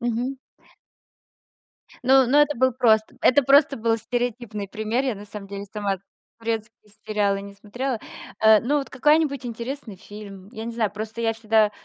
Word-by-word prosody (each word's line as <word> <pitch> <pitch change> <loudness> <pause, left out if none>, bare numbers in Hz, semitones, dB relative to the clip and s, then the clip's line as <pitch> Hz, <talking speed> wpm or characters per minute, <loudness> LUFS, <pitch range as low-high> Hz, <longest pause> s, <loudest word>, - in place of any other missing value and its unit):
мгм. 240 +3 -2 1.7
Но 265 0 +6
но 285 +4 +5
это 295 -2 0
был 260 +1 +3
просто 220 -3 +2
это 285 +3 +5
просто 275 +1 +5
был 225 0 +1
стереотипный 230 -3 -3
пример. 220 +5 -1
Я 260 -4 0
на 205 +1 -10
самом 200 -1 -9
деле 200 0 -6
сама 200 -2 -2 0.4
турецкие 225 -1 -5 0.2
сериалы 205 -2 +1
не 200 0 -10
смотрела. 240 +5 -4 0.5
Э, 220 -1 +8
ну, 290 +5 +1
вот 275 - -5
какая-нибудь 280 -1 +2
интересный 235 -2 -6
фильм. 200 -1 -11
Я 220 -2 -6
не 235 - -4
знаю, 220 -3 0
просто 220 +2 -6
я 225 0 +2
всегда 220 -1 +2
225 Hz, 160 wpm, -24 LUFS, 210-255 Hz, 1.7 s, Э